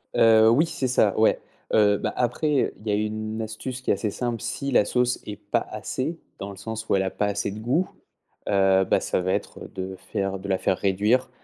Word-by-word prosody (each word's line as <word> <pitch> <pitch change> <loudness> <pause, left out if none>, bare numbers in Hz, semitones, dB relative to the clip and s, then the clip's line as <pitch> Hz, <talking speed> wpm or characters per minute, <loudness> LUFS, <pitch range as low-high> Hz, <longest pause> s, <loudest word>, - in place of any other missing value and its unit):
Heu, 110 -1 +6
oui 140 +8 +4
c'est 135 -5 -2
ça 110 -5 +2
ouais. 110 - +4 0.3
Heu, 105 -1 +5
bah - - -3
après, 125 +5 0 0.2
heu, - - -3
il 110 - -11
y - - +1
a - - +3
une 110 +1 -2
astuce 120 +4 -5
qui - - 0
est - - +5
assez 105 +1 -2
simple. 120 0 -3
Si 140 0 -3
la 115 - +5
sauce 125 +3 +1
est 105 -1 -6
pas - - -1
assez, 160 +6 -3 0.2
dans 100 +1 -6
le 100 - -11
sens 110 +2 -6
où - - +4
elle 95 - +2
a 95 - -1
pas 105 - -1
assez 100 0 -1
de 105 +2 -7
goût, 135 +11 +1 0.6
heu, 95 -1 +4
bah - - +2
ça - - -1
va 95 +1 -1
être - - -4
de 95 0 -5
faire 95 0 -3
de 100 +1 -7
la 95 - +2
faire 95 - 0
réduire. 105 +7 +1
110 Hz, 235 wpm, -25 LUFS, 100-120 Hz, 0.6 s, Heu